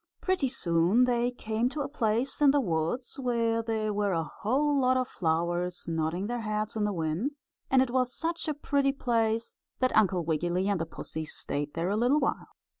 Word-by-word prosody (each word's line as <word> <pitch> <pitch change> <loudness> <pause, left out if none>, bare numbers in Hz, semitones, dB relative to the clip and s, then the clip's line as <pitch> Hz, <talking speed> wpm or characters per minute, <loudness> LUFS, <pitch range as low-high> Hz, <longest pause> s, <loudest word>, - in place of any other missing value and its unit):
Pretty 370 -8 +1
soon 180 -2 +2
they 245 -1 +2
came 230 -1 -1
to 295 +2 -4
a 275 - -2
place 240 +1 0
in 290 - +7
the 285 +1 +4
woods 195 - -2
where 230 -3 +1
there 220 -2 -1
were 205 -1 0
a 165 -1 0
whole 275 - 0
lot 255 0 +3
of 255 -1 0
flowers 175 +1 -1
nodding 165 +3 -1
their 240 +2 -3
heads 215 0 -2
in 215 -1 0
the 210 - 0
wind, 175 - -2 0.3
and 260 -1 +5
it 250 - -4
was 255 -1 +1
such 330 +3 -2
a 305 - -1
pretty 280 -1 +1
place 230 -3 0 0.2
that 255 0 +1
Uncle 185 -5 +3
Wiggily 175 +4 0
and 200 -4 0
the 165 - -3
pussy 160 0 -5
stayed 145 -1 -3
there 170 +2 -1
a 205 - +1
little 250 +6 +3
while. 275 - -1
225 Hz, 195 wpm, -29 LUFS, 175-255 Hz, 0.3 s, in